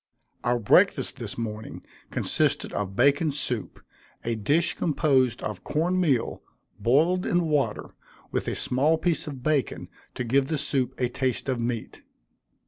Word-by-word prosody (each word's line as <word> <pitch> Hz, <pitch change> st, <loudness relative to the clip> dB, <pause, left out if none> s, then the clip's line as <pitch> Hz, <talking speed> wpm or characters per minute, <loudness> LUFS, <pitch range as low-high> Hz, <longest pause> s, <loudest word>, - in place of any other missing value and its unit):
Our 120 Hz, +1 st, +2 dB
breakfast, 110 Hz, -4 st, +3 dB
this -, -, -5 dB
morning, 110 Hz, -2 st, -5 dB, 0.3 s
consisted -, -, 0 dB
of 100 Hz, -1 st, -3 dB
bacon 145 Hz, -, +3 dB
soup, 125 Hz, -6 st, -2 dB, 0.5 s
a 120 Hz, -, 0 dB
dish 145 Hz, +11 st, +1 dB
composed 135 Hz, -6 st, +1 dB
of -, -, -5 dB
corn 175 Hz, +4 st, 0 dB
meal, 140 Hz, -10 st, +1 dB, 0.4 s
boiled 165 Hz, +9 st, +3 dB
in 175 Hz, -2 st, +1 dB
water, 145 Hz, -3 st, 0 dB, 0.4 s
with -, -, -1 dB
a -, -, -1 dB
small 145 Hz, +6 st, +2 dB
piece 165 Hz, -1 st, 0 dB
of 135 Hz, -4 st, -7 dB
bacon 150 Hz, -3 st, 0 dB, 0.3 s
to -, -, -2 dB
give 135 Hz, +3 st, +2 dB
the 155 Hz, -, -1 dB
soup 130 Hz, -3 st, -1 dB
a 125 Hz, -, +2 dB
taste 130 Hz, +1 st, -2 dB
of 130 Hz, -2 st, 0 dB
meat. 115 Hz, -1 st, -4 dB
135 Hz, 145 wpm, -26 LUFS, 120-155 Hz, 0.5 s, breakfast